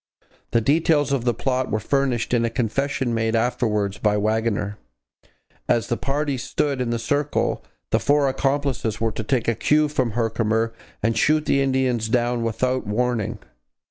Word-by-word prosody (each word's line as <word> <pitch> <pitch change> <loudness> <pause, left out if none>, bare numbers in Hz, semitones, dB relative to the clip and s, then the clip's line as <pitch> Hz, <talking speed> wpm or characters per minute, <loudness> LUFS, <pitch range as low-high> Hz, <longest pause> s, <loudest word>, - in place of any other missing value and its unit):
The 115 - +2
details 145 +2 +2
of 135 -4 0
the 120 - +2
plot 130 +2 -1
were 110 - 0
furnished 130 0 0
in 120 -1 +3
a 115 - +1
confession 125 +2 -1
made 115 0 0
afterwards 110 -4 0
by 105 -1 +2
Waggoner. 105 -1 -1 0.9
As 120 -2 +2
the 120 - +1
parties 140 0 -2
stood 140 -1 -1
in 125 - -1
the 120 - 0
circle, 145 +5 -1 0.3
the - - +3
four 145 0 +3
accomplices 135 -4 -1
were 115 0 0
to - - -5
take 130 -4 0
a 115 - +3
cue 150 +6 +2
from 130 -6 -1
Herkimer 115 0 0 0.3
and 115 +1 +2
shoot 155 +7 +2
the 140 - +2
Indians 130 -4 +1
down 120 0 +1
without 125 +2 -1
warning. 115 0 -1
120 Hz, 165 wpm, -23 LUFS, 115-135 Hz, 0.9 s, in